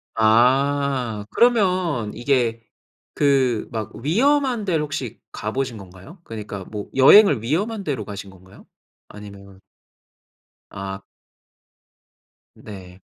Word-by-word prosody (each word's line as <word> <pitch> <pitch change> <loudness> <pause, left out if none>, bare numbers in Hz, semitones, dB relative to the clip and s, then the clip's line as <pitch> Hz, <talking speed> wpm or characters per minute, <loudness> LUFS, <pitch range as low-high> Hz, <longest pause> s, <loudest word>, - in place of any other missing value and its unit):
아. 125 0 +2
그러면 185 - +1
이게 120 -3 0 0.5
그 135 -6 +1
막 110 -3 -5
위험한 255 - +1
데를 165 -5 0
혹시 140 -6 -5
가 105 - -5
보신 130 -2 -3
건가요? 95 - -14
그러니까 105 -3 -7
뭐 105 0 -7
여행을 140 - +7
위험한 200 - -2
데로 130 - -3
가신 100 -1 -8
건가요? 95 +1 -18 0.4
아니면 100 -2 -13 1.1
아. 95 0 -7 1.5
네. 95 -3 -12
120 Hz, 200 characters per minute, -21 LUFS, 105-150 Hz, 1.5 s, 여행을